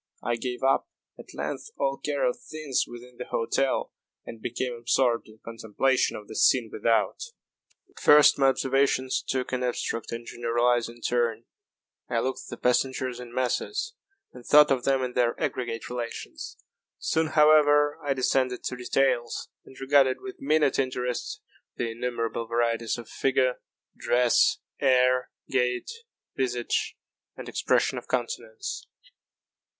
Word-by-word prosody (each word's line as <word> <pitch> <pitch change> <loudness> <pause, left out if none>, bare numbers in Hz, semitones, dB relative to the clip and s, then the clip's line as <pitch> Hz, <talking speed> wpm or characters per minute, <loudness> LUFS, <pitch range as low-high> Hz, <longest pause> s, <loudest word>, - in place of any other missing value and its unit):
I 120 - 0
gave 125 +1 -5
up, 135 0 +2 0.3
at - - -12
length, - - -4
all - - 0
care - - 0
of - - 0
things 155 - -2
within 120 +1 -12
the 125 - -6
hotel, 130 +4 -1 0.3
and 115 - -9
became 125 +2 -3
absorbed 120 0 +1
in 110 0 -16
contemplation 115 +3 0
of 105 - -11
the 110 - -9
scene 115 -1 +3
without. 115 +1 +1 0.7
At - - -17
first 150 -1 +6
my 135 - +5
observations 135 0 +1
took 130 -1 -3
an 130 -1 -1
abstract 120 -2 -2
and 115 0 -5
generalizing 120 0 0
turn. 115 -2 0 0.6
I 120 - -1
looked 130 +2 -2
at - - -12
the - - -7
passengers 130 0 0
in 125 -1 -9
masses, 410 - -2 0.4
and 125 - -12
thought 150 +3 +6
of 130 -2 +1
them 135 -1 +2
in 125 -1 -3
their 120 -1 +1
aggregate 115 -3 -3
relations. 120 -1 -6 0.4
Soon, 160 0 0
however, 150 -1 +5
I 140 -1 0
descended 130 -1 0
to - - -3
details, 125 -1 0 0.2
and 130 - -15
regarded 135 -1 +3
with 195 -1 -9
minute 150 0 +2
interest 125 -2 -2 0.3
the 115 -1 -2
innumerable 115 -1 -3
varieties 115 0 0
of 120 - -9
figure, 130 -1 0 0.3
dress, 125 0 +3 0.2
air, 125 -1 +3 0.2
gait, 125 - 0 0.4
visage, 125 -3 -1 0.4
and - - -8
expression - - +1
of - - -18
countenance. 460 -4 -4
125 Hz, 140 wpm, -26 LUFS, 120-135 Hz, 0.7 s, first